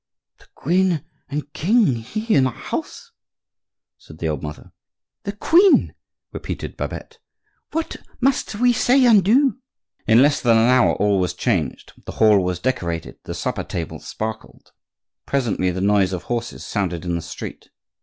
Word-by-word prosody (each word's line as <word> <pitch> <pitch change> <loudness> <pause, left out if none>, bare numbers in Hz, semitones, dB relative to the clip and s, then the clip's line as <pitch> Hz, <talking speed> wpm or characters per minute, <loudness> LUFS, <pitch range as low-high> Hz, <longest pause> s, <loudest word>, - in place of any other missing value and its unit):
"The - - -21
queen 175 -1 +1 0.3
and 145 +1 -5
king 200 - +2
here 215 - 0
in 130 - +3
our 125 - -4
house!" - - -6 0.9
said 75 - -15
the 80 0 -2
old 75 -3 -3
mother. 75 0 -8 0.5
"The 200 - -2
queen!" 340 - +4 0.4
repeated - - -6
Babette. - - -6 0.5
"What 325 +1 -3 0.2
must 260 -4 0
we 245 +3 +3
say 255 +3 +4
and 215 -5 +6
do?" 260 +7 +3 0.5
In 115 +3 +6
less 145 0 +2
than 115 -2 +4
an 115 +2 +4
hour 130 -1 +4
all 100 -1 +2
was 90 -1 -1
changed; 90 -7 -2
the - - -5
hall 105 -3 +4
was 90 -1 -1
decorated; 85 -7 -3
the - - -5
supper - - -3
table 85 -2 -5
sparkled. 110 - -7 0.6
Presently 120 -9 0
the 90 +1 -3
noise 100 -2 +2
of 90 - -4
horses 120 -1 -4
sounded 90 -5 -2
in 85 - -1
the 85 - -2
street. 85 - -8
120 Hz, 155 wpm, -21 LUFS, -, 0.9 s, and